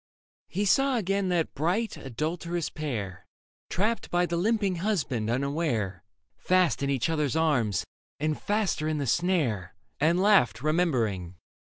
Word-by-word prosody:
He 200 +4 -1
saw 270 +6 +3
again 195 -2 0
that 170 -3 0
bright, 180 +10 0
adulterous 160 +6 -3
pair. 105 - -5 0.4
Trapped 215 +5 -1
by 175 0 +2
the 175 - -2
limping 200 0 +1
husband 155 - -1
unaware, 125 - -1 0.3
Fast 185 -5 +2
in 140 - 0
each 135 -4 +1
other's 150 -3 0
arms, 140 -11 +1 0.3
and 155 +1 -1
faster 205 -7 0
in 155 -1 0
the 145 - -1
snare 130 - 0
— - - -46
And 165 +4 +3
laughed 185 - +4
remembering. 120 - 0
160 Hz, 140 wpm, -27 LUFS, 125-185 Hz, 0.4 s, laughed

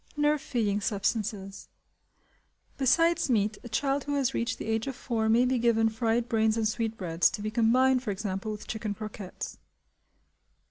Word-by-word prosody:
Nerve 295 0 +2
Feeding 210 -5 -1
Substances. 200 -1 -2 1.1
Besides 330 +5 +3
meat 215 -3 +1
a 240 - -8
child 275 +3 0
who 290 0 -1
has 270 -2 +1
reached 235 - -1
the - - -6
age 225 +2 -1
of 270 - -3
four 225 -3 -1
may 235 +3 +4
be 255 0 +1
given 225 -1 +3
fried 230 +1 0
brains 220 -1 +2
and 220 -1 +2
sweetbreads, 210 -7 0
to - - -6
be 215 - -2
combined, 250 +3 +3
for 245 - -5
example, 195 +1 -3
with 210 0 -7
chicken 215 -2 -4
croquettes. 210 -2 -7
225 Hz, 160 wpm, -28 LUFS, 215-255 Hz, 1.1 s, may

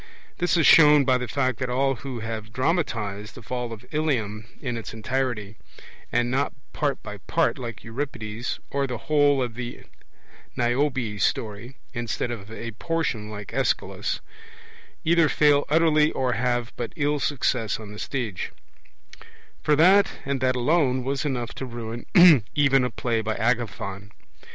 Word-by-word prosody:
This 175 0 +2
is 165 - +3
shown 150 -3 +8
by 130 -1 +3
the 125 - -4
fact 130 0 0
that 130 - -2
all 135 +2 +2
who 130 -4 -6
have 110 0 -5
dramatized 115 - -1
the 125 - -11
fall 125 +1 -4
of 110 -2 -9
Ilium 115 -9 -1
in 125 -4 -3
its 115 0 -6
entirety, 115 -3 -2 0.5
and 120 0 +1
not 135 +1 0 0.2
part 145 -2 -1
by 105 - -7
part, 165 -4 +1
like 115 -6 -6
Euripides, 115 -2 -4
or 140 0 0
the 125 -2 -4
whole 145 0 +3
of 120 -2 -4
the 120 0 -7 0.7
Niobe 120 -3 0
story, 110 +5 -1 0.2
instead 120 +1 -2
of 110 -2 -7
a 115 +1 -6
portion, 120 -5 -2
like 105 -1 -8
Aeschylus, 135 +1 -1 0.8
either 165 -1 +4
fail 145 -1 +4
utterly 155 -1 +4
or 130 -2 0
have 120 0 -1
but 120 - -5
ill 150 -2 0
success 125 -7 0
on 105 -2 -9
the 105 - -9
stage; 115 -7 -3 1.1
for 150 - +3
that 190 +6 +5
and 140 -1 -1
that 130 0 +2
alone 130 -1 +2
was 135 +2 -2
enough 125 -5 -2
to 135 - -5
ruin 120 -1 -6
a 140 - +6
play 115 -3 -1
by 110 0 -2
Agathon. 110 -4 -2
125 Hz, 150 wpm, -25 LUFS, 115-140 Hz, 1.1 s, shown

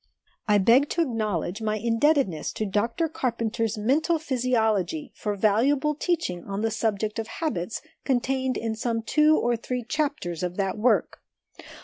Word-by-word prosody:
I 210 -1 +5
beg 235 +8 +4
to 340 - +1
acknowledge 215 - -2
my 215 -1 0
indebtedness 230 - +1
to 215 - -2
Dr 230 - 0
Carpenter's 230 -5 -2
Mental 290 +10 +2
Physiology 255 - 0
for 210 -1 -3
valuable 260 +9 +2
teaching 300 - -2
on 200 +2 -3
the 225 - +1
subject 215 0 -1
of 225 - -3
habits 230 - -3 0.2
contained 260 0 0
in 225 -1 -2
some 225 0 -2
two 305 +6 +4
or 240 0 +1
three 245 +2 -4
chapters 280 - -2
of 180 0 -3
that 195 -1 0
work. 225 +3 +1
230 Hz, 145 wpm, -26 LUFS, 210-275 Hz, 0.2 s, I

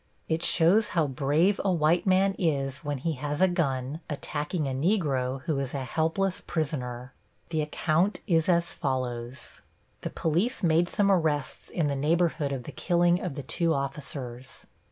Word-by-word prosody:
It 160 +1 -1
shows 200 +6 +5
how 160 - +4
brave 150 +8 +1
a 195 - +2
white 170 +2 +2
man 190 +1 +4
is 140 -5 0
when 145 -3 -3
he 165 +6 -2
has 145 0 -2
a 190 - +5
gun 140 -5 -1
attacking 150 +1 -2
a - - -2
Negro 135 -5 0
who 150 -4 -1
is 135 0 -3
a 135 - -2
helpless 165 +8 0
prisoner. 130 -5 -3 0.4
The 160 -2 +1
account 160 +5 +1
is 165 -3 +2
as 170 -1 +2
follows: 125 -1 -4 0.4
The - - -3
police 180 +10 -1
made 170 +1 +3
some 200 -1 +3
arrests 155 -6 0
in 170 - -1
the 140 -1 0
neighborhood 155 0 +1
of 135 -3 -3
the - - -8
killing 175 0 +2
of 170 -7 -4
the 140 - -5
two 165 +5 +1
officers. 135 -2 -5
155 Hz, 165 wpm, -27 LUFS, 135-175 Hz, 0.4 s, shows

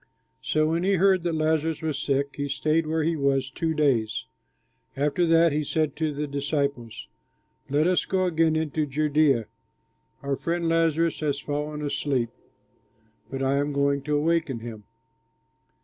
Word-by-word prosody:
So 155 0 +1
when 165 +1 0
he 195 +1 +2
heard 190 0 +4
that 170 -1 -1
Lazarus 160 0 0
was 155 -3 -1
sick, 140 -1 0
he 145 0 -3
stayed 155 +3 +1
where 160 0 0
he 165 +1 +1
was 135 -2 0
two 160 +3 -2
days. 130 -8 +1 0.7
After 150 +5 +1
that 165 0 +5
he 150 +1 0
said 155 0 -1
to 160 -1 0
the 150 +1 -3
disciples, 140 -5 -3 0.6
"Let 145 +3 +2
us 180 0 +2
go 185 -1 0
again 165 -2 +2
into 155 -1 -1
Judea. 145 -4 +2 0.8
Our 140 -1 -1
friend 170 0 -1
Lazarus 165 0 +2
has 145 -2 -1
fallen 150 +1 -4
asleep, 135 -5 -1 1.0
but 135 0 -3
I 135 +1 +2
am 145 +1 0
going 140 0 +1
to 150 -1 +1
waken 155 -6 0
him." 110 -3 -8
150 Hz, 155 wpm, -25 LUFS, 140-160 Hz, 1.0 s, that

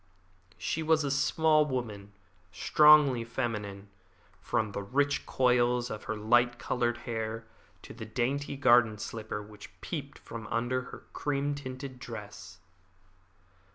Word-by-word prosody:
She 160 - -2
was 160 0 +3
a 140 - -1
small 155 +3 +3
woman, 110 -8 -4 0.4
strongly 150 -5 +5
feminine, 105 -5 -4 0.5
from 110 -2 -1
the 100 - -4
rich 140 +8 0
coils 125 -1 +2
of 105 - -6
her 110 - -2
light 120 +3 +3
coloured 120 -1 -1
hair 115 -1 -3 0.4
to - - -10
the 110 -1 -8
dainty 135 +5 -2
garden 120 -5 +5
slipper 110 0 -5
which 105 -1 -14
peeped - - -6
from 115 -2 -8
under 120 +3 -1
her - - -11
cream 145 0 -1
tinted 130 -2 -7
dress. 105 -6 -9
120 Hz, 125 wpm, -30 LUFS, 110-135 Hz, 0.5 s, strongly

